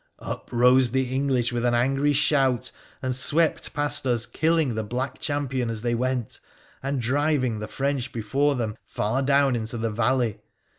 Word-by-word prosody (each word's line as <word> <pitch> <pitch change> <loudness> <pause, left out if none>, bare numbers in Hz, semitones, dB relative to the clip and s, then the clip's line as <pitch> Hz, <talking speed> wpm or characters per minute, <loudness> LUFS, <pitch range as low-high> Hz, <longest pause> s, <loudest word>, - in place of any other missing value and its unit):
Up - - -7
rose 125 +1 +4
the 130 +1 -1
English 130 -3 +1
with 120 0 -1
an 120 -1 +2
angry 135 +4 +2
shout, 135 -4 +2 0.3
and 130 -1 0
swept 155 +5 +1
past 145 -2 +1
us, 120 -2 +2
killing 160 -4 +1
the 110 - -2
black 130 +5 -4
champion 135 -5 -2
as 110 -1 -1
they 120 -1 0
went, 125 0 -2 0.4
and 135 0 -2
driving 130 -2 0
the 105 - -5
French 135 0 -2
before 135 +6 0
them 110 -4 -2
far 115 +6 -2
down 140 -1 +3
into 115 +1 -4
the 115 0 -2
valley. 120 0 0
130 Hz, 165 wpm, -25 LUFS, 120-140 Hz, 0.4 s, rose